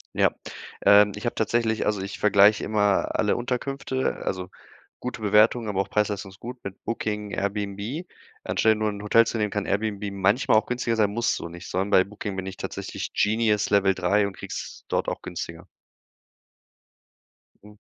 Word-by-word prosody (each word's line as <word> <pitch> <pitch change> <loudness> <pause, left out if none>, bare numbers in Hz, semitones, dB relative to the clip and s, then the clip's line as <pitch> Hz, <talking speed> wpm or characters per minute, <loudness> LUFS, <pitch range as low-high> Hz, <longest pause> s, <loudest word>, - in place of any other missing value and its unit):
Ja, - - +4 0.5
ähm, 100 +1 +7
ich 105 - -7
habe 120 - -1
tatsächlich 110 0 0
also, 105 -2 0
ich 95 - -6
vergleiche 100 0 +5
immer 105 -2 +1
alle - - +2
Unterkünfte, 130 +2 -2
also, 90 -1 -3 0.5
gute 125 -3 -5
Bewertungen, 110 +2 +4
aber 95 -1 -1
auch - - -5
Preisleistung 105 -2 -1
ist 95 - -17
gut 125 +2 -7
mit 100 0 -8
Booking, 105 -2 -3
Airbnb. 100 - -3 0.4
Anstelle 110 0 +2
nur 110 0 0
'n 100 0 -6
Hotel 115 +2 +5
zu 115 - -2
nehmen, 105 -1 0
kann 105 -2 -2
Airbnb 105 0 -1
manchmal 100 +4 +3
auch 110 - +2
günstiger 120 -1 -1
sein, 105 -2 +2
muss 120 +2 0
so 85 - -6
nicht, 85 +1 -10
sondern 95 +3 -1
bei 95 - +6
Booking 100 0 -6
bin 95 - -4
ich 95 - -7
tatsächlich - - -5
Genius 105 -1 +2
Level 100 -1 +4
3 100 +2 +2
und 100 -1 -5
kriege - - -9
es - - -7
dort - - -1
auch - - -3
günstiger. 85 -1 -7 2.0
Hm. 105 0 -15
105 Hz, 180 wpm, -25 LUFS, 100-110 Hz, 2.0 s, ähm